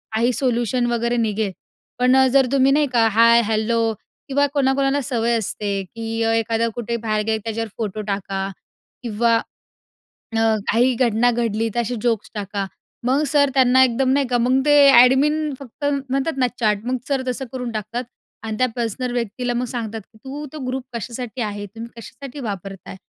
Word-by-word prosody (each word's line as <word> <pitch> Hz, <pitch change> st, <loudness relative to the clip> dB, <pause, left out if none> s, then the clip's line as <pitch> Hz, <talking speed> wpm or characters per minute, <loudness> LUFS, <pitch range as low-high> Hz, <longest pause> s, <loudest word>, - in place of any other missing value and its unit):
काही 235 Hz, +3 st, +2 dB
सोल्युशन 240 Hz, 0 st, 0 dB
वगैरे 235 Hz, +1 st, 0 dB
निघेल." 215 Hz, -3 st, 0 dB, 0.5 s
पण 250 Hz, +1 st, +4 dB
अ, 265 Hz, -, +6 dB
जर 275 Hz, -1 st, +5 dB
तुम्ही 270 Hz, 0 st, +4 dB
नाही 295 Hz, 0 st, +3 dB
का, 230 Hz, -1 st, +4 dB
हाय, 230 Hz, +2 st, +5 dB
हॅलो 225 Hz, +1 st, +1 dB, 0.4 s
किंवा 285 Hz, +1 st, +3 dB
कोणाकोणाला 275 Hz, 0 st, +2 dB
सवय 235 Hz, -3 st, 0 dB
असते, 200 Hz, -2 st, -2 dB
की 225 Hz, +3 st, -5 dB, 0.2 s
एखादा 225 Hz, +1 st, 0 dB
कुठे 235 Hz, -1 st, -3 dB
बाहेर 215 Hz, -2 st, -1 dB
गेले 220 Hz, 0 st, +1 dB
की -, -, -10 dB
त्याच्यावर 225 Hz, 0 st, -3 dB
फोटो 215 Hz, -2 st, -3 dB
टाका 195 Hz, -1 st, -2 dB, 0.6 s
किंवा 230 Hz, +1 st, +2 dB, 1.0 s
अ, 225 Hz, 0 st, +3 dB, 0.2 s
काही 245 Hz, +3 st, +3 dB
घटना 240 Hz, 0 st, +2 dB
घडली 225 Hz, -1 st, -1 dB
असे 235 Hz, +2 st, -2 dB
जोक्स 230 Hz, -4 st, 0 dB
टाका. 200 Hz, -1 st, -3 dB, 0.4 s
मग 270 Hz, +4 st, +2 dB
सर 285 Hz, -1 st, +3 dB
त्यांना 260 Hz, -1 st, +5 dB
एकदम 255 Hz, +1 st, +1 dB
नाही 280 Hz, 0 st, +2 dB
का 245 Hz, -, +2 dB
मग 250 Hz, +3 st, +2 dB
ते -, -, +4 dB, 0.3 s
एडमिन 295 Hz, +4 st, +3 dB
फक्त 275 Hz, +2 st, -10 dB
म्हणतात 275 Hz, +1 st, 0 dB
ना 255 Hz, -, +3 dB
चॅट 210 Hz, -1 st, +1 dB
मग 255 Hz, +1 st, 0 dB
सर 275 Hz, -2 st, 0 dB
तसं 255 Hz, +2 st, -2 dB
करून 250 Hz, -2 st, -4 dB
टाकतात 220 Hz, +3 st, -4 dB, 0.4 s
आणि 220 Hz, -1 st, -4 dB
त्या 255 Hz, -, +3 dB
पर्सनल 240 Hz, +1 st, -2 dB
व्यक्तीला 245 Hz, +1 st, -2 dB
मग 245 Hz, +1 st, -1 dB
सांगतात, 225 Hz, -2 st, -4 dB
की 220 Hz, +2 st, -22 dB
"तू 285 Hz, +3 st, -6 dB
तो 310 Hz, -, -7 dB
ग्रुप 260 Hz, +1 st, -2 dB
कशासाठी 240 Hz, +2 st, -6 dB
आहे? 205 Hz, -1 st, -4 dB
तुम्ही 225 Hz, +4 st, -9 dB
कशासाठी 275 Hz, +4 st, -9 dB
वापरताय?" 195 Hz, -1 st, -7 dB
235 Hz, 170 wpm, -21 LUFS, 220-260 Hz, 1.0 s, अ